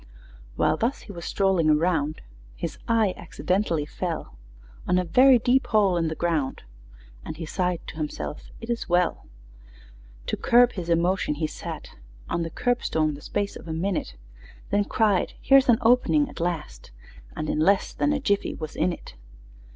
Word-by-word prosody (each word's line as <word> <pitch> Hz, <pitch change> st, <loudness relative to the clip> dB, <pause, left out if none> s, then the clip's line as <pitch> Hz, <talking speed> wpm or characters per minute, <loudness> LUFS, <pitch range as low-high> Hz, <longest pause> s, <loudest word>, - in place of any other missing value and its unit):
While -, -, +2 dB
thus 245 Hz, +5 st, -1 dB
he 210 Hz, -, -11 dB
was 170 Hz, -3 st, -8 dB
strolling 190 Hz, -5 st, +2 dB
around, 155 Hz, -1 st, +1 dB, 0.3 s
His -, -, -5 dB
eye 220 Hz, -4 st, +2 dB
accidentally 180 Hz, -5 st, -1 dB
fell 165 Hz, -, -5 dB, 0.5 s
On 180 Hz, -, +3 dB
a 180 Hz, -, +2 dB
very 255 Hz, +9 st, +6 dB
deep 250 Hz, +3 st, +2 dB
hole 205 Hz, -5 st, +3 dB
in 165 Hz, -1 st, +1 dB
the 160 Hz, -, -3 dB
ground, 160 Hz, -6 st, -1 dB, 0.6 s
And 155 Hz, -, -7 dB
he 165 Hz, -, -5 dB
sighed 180 Hz, +1 st, -1 dB
to -, -, -9 dB
himself, 150 Hz, -1 st, -5 dB
"It 230 Hz, +1 st, -5 dB
is 235 Hz, -, -3 dB
well!" 175 Hz, 0 st, +1 dB, 1.0 s
To -, -, -1 dB
curb 245 Hz, +1 st, +4 dB
his 175 Hz, -3 st, -6 dB
emotions, 170 Hz, -2 st, +1 dB
he 155 Hz, -, 0 dB
sat -, -, -7 dB, 0.4 s
On 170 Hz, -, -1 dB
the 165 Hz, -, -2 dB
curbstone 160 Hz, -8 st, 0 dB
the 145 Hz, -, -9 dB
space 200 Hz, +5 st, -3 dB
of -, -, -10 dB
a 160 Hz, -, -3 dB
minute, 165 Hz, -, -2 dB, 0.6 s
Then 205 Hz, 0 st, +2 dB
cried, 205 Hz, -4 st, +1 dB
"Here's 270 Hz, -1 st, +5 dB
an 235 Hz, -, +6 dB
opening 250 Hz, +5 st, +4 dB
at -, -, -10 dB
last!" 165 Hz, -, -4 dB, 0.5 s
And 155 Hz, -, -3 dB
in -, -, -1 dB
less 195 Hz, +5 st, +2 dB
than 295 Hz, -, +1 dB
a 290 Hz, -, 0 dB
jiffy 205 Hz, -7 st, 0 dB
was 155 Hz, -1 st, -7 dB
in 180 Hz, -, +1 dB
it! -, -, -9 dB
180 Hz, 170 wpm, -25 LUFS, 160-220 Hz, 1.0 s, very